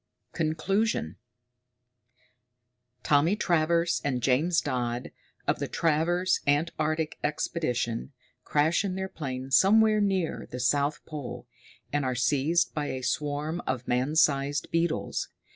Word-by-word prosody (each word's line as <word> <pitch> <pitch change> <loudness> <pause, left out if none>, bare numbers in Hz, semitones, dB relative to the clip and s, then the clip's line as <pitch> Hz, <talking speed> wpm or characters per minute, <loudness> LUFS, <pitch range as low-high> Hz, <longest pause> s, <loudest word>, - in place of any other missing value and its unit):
_] - - -49
CONCLUSION 170 - 0 1.9
Tommy 155 +6 +3
Travers 170 -3 +1
and 130 -4 -1
James 155 +8 +3
Dodd, 125 -3 -2 0.4
of - - +1
the - - -2
Travers 170 +3 +1
Antarctic 155 +1 0
Expedition, 135 -6 -2 0.3
crash 155 +5 +2
in 190 -2 -2
their 190 0 -3
plane 135 -6 -6
somewhere 215 +6 +5
near 190 -4 -1
the 125 - -6
South 140 +4 +1
Pole, 125 -5 -7 0.5
and 145 -1 +1
are 130 -1 -1
seized 145 +7 +1
by 150 -2 -2
a 130 -2 -4
swarm 150 +5 -2
of 130 -1 -2
man 130 +5 0
sized 145 -1 +2
beetles. 165 -1 -1
150 Hz, 120 wpm, -28 LUFS, 130-170 Hz, 1.9 s, somewhere